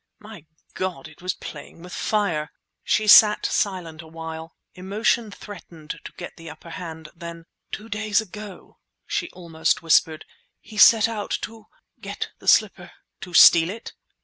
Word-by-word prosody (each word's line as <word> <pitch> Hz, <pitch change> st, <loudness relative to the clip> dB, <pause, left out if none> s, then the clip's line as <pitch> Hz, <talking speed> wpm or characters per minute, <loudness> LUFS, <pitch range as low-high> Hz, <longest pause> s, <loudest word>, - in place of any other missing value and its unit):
"My 210 Hz, -7 st, -13 dB, 0.3 s
God! 180 Hz, -7 st, -4 dB
it 155 Hz, +1 st, -17 dB
was 180 Hz, 0 st, -2 dB
playing 160 Hz, +2 st, -10 dB
with 180 Hz, -, -10 dB
fire!" 175 Hz, -8 st, -1 dB, 0.3 s
She 215 Hz, -, +1 dB
sat 210 Hz, 0 st, +7 dB
silent 175 Hz, -5 st, -2 dB
awhile. 160 Hz, 0 st, -9 dB, 0.2 s
Emotion 210 Hz, +4 st, -1 dB
threatened 175 Hz, -6 st, -10 dB
to -, -, -9 dB
get 175 Hz, -, -9 dB
the 165 Hz, -1 st, -10 dB
upper 165 Hz, +2 st, -12 dB
hand. 160 Hz, -3 st, -8 dB
Then— 170 Hz, -1 st, -9 dB, 0.3 s
"Two 215 Hz, -, -7 dB
days 215 Hz, -1 st, 0 dB
ago," 210 Hz, -2 st, -10 dB, 0.3 s
she 345 Hz, -, -3 dB
almost 165 Hz, -2 st, -2 dB
whispered, 160 Hz, -1 st, +2 dB, 0.3 s
"he 220 Hz, -, -15 dB
set 220 Hz, 0 st, +7 dB
out—to... 225 Hz, 0 st, -5 dB, 0.3 s
get -, -, -6 dB
the -, -, -15 dB
slipper!" -, -, +3 dB, 0.3 s
"To 180 Hz, -2 st, -8 dB
steal 165 Hz, 0 st, +8 dB
it?" 225 Hz, +4 st, -8 dB
180 Hz, 145 wpm, -23 LUFS, 165-210 Hz, 0.3 s, steal